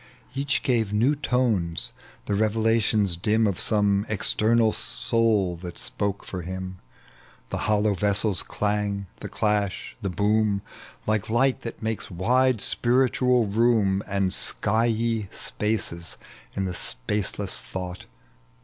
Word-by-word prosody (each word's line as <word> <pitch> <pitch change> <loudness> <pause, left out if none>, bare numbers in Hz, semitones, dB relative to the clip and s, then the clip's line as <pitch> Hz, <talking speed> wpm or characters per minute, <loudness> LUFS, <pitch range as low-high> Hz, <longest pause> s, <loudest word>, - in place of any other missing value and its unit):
Each 140 +1 -1
gave 115 -5 +1
new 120 +8 +3
tones, 95 - 0 0.3
the - - -2
revelations 110 -2 +2
dim 110 +6 +2
Of 100 -4 0
some 105 -2 +2
external 110 +2 +3
soul 105 - +1
that 85 0 -8
spoke 100 -1 -3
for 90 - -5
him 95 +1 -6
r - - -31 0.7
The - - -1
hollow 105 0 +3
vessel's 100 +1 +2
clang, 105 -1 -2
the - - -6
clash, 105 -2 -1
the 100 - -2
boom, 105 +2 +1 0.4
Like 110 -2 0
light 130 +3 +2
that 115 -1 -7
malces 110 -2 -3
wide 120 +6 +2
spiritual 125 0 +2
room 105 -2 +2
And 100 -2 +2
skyey 115 -1 +1
spaces 105 -6 -3 0.4
in 95 - -1
the 90 - -3
spaceless 95 +7 -2
thought. 90 -1 -6
105 Hz, 120 wpm, -25 LUFS, 95-115 Hz, 0.7 s, new